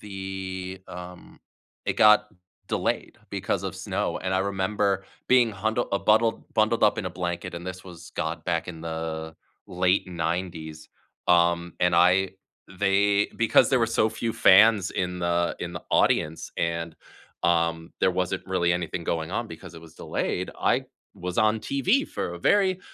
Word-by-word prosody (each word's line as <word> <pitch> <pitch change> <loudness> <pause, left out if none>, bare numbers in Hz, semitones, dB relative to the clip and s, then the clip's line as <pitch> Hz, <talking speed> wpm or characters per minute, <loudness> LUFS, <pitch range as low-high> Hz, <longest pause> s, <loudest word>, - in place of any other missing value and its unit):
The 95 -2 -6
um 90 0 -10 0.5
it - - -1
got 105 0 +6 0.4
delayed - - -2
because - - -2
of - - -4
snow. - - -2
And 95 0 -3
I - - +2
remember 100 0 0 0.2
being 125 -3 +4
hundl 110 +4 -1
a 100 - +1
buttl 110 +1 +3
bundled 110 +1 +2
up 105 - +4
in - - -3
a - - -3
blanket, 85 0 -4
and 85 +1 -7
this 90 0 -7
was 85 -2 -12
got 80 +1 -3
back 85 -2 -1
in 80 -3 -7
the 80 -1 -5 0.3
late 90 +2 +1
'90s. 80 -2 -4 0.4
Um, 85 -1 +3
and 90 -1 +3
I 90 +2 +4 0.5
they 100 +1 +3
because 115 -1 +4
there 130 - +3
were 115 - +2
so 110 -1 +2
few 115 +1 -3
fans 100 0 +6
in 90 0 -2
the 85 0 0
in 85 - -5
the 85 - -6
audience 80 +1 +1
and, 85 -1 -2 0.5
um, 85 -1 +1
there 95 - +4
wasn't 90 0 -2
really 90 -2 +1
anything 85 -1 -3
going 80 -1 -2
on - - -2
because - - -11
it 80 - -10
was 80 -1 -15
delayed, - - -3
I - - +2 0.3
was 90 0 -5
on 110 +1 +3
TV 185 - +1
for 85 - -4
a - - -8
very 190 - +2
90 Hz, 165 wpm, -26 LUFS, 85-100 Hz, 0.5 s, got